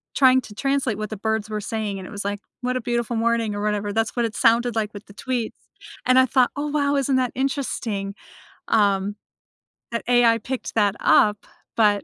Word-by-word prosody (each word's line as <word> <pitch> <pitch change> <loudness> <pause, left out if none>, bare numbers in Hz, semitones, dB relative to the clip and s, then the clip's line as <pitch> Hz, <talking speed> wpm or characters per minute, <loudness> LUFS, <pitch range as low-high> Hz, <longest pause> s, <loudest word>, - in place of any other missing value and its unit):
trying 260 -1 +6
to 210 -3 -12
translate 275 -4 0
what 215 -1 -4
the 215 - -5
birds 220 +1 -1
were 215 -1 -3
saying, 205 -2 -3
and 185 - -8
it - - -11
was 205 -1 -5
like, 205 0 -2 0.2
"What 250 +1 -1
a - - -3
beautiful 235 0 -1
morning," 230 -2 +1
or 205 - -4
whatever, 210 -1 -1
that's 225 +1 0
what 240 -1 +1
it 225 - -4
sounded 235 0 +3
like 215 -1 -1
with 205 0 -10
the 200 - -15
tweets, 240 +1 -3 0.5
and 255 0 +4
I 260 - +7
thought, 255 0 +3
“Oh, 290 +1 -2
wow. 285 -1 +1
Isn't 275 -1 +2
that 250 -1 0
interesting?” 235 -7 -2 0.5
Um, 200 -2 +2 0.8
that 230 - -2
AI 240 -2 +5
picked 255 +3 -5
that 205 -2 +3
up, 210 -1 +3 0.3
but, 205 -2 +3
225 Hz, 205 wpm, -23 LUFS, 210-255 Hz, 0.8 s, I